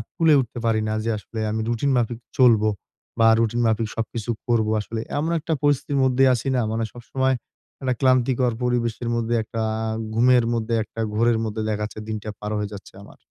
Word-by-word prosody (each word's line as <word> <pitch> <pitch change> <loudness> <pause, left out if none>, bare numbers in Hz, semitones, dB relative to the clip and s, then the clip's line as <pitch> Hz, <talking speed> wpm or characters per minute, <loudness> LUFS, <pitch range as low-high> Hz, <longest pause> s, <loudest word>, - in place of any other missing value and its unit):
কুলাই 160 -3 +5
উঠতে 120 -1 -7
পারি 110 -1 +2
না 110 - -1
যে, 115 - -1
আসলে 110 +2 -8
আমি 110 0 -1
রুটিন 120 +4 0
মাফিক 120 -1 -1 0.2
চলবো 115 -4 +5 0.5
বা 115 - +6
রুটিন 115 +1 +1
মাফিক 110 0 +1
সবকিছু 115 0 -4 0.2
করবো 110 -3 +2
আসলে। 110 +2 -5 0.2
এমন 160 +3 0
একটা 160 +2 -2
পরিস্থিতির 145 0 +1
মধ্যেই 130 0 +4
আছি 125 +2 -3
না? 125 - +2
মানে 115 0 -1
সবসময় 130 +2 -1 0.4
মানে 130 -2 0
ক্লান্তিকর 130 -2 +2
পরিবেশের 120 -1 -1
মধ্যে, 115 0 0
একটা 115 +1 -5 0.5
ঘুমের 125 0 +5
মধ্যে, 115 0 -1
একটা 115 - -12 0.2
ঘোরের 115 0 +3
মধ্যে 110 0 -3
দেখা 105 0 -1
যাচ্ছে 110 0 -6
দিনটা 110 -1 -4
পার 105 0 -5
হয়ে 105 - -3
যাচ্ছে 100 - -10
আমার। - - -15
115 Hz, 185 wpm, -23 LUFS, 110-125 Hz, 0.5 s, বা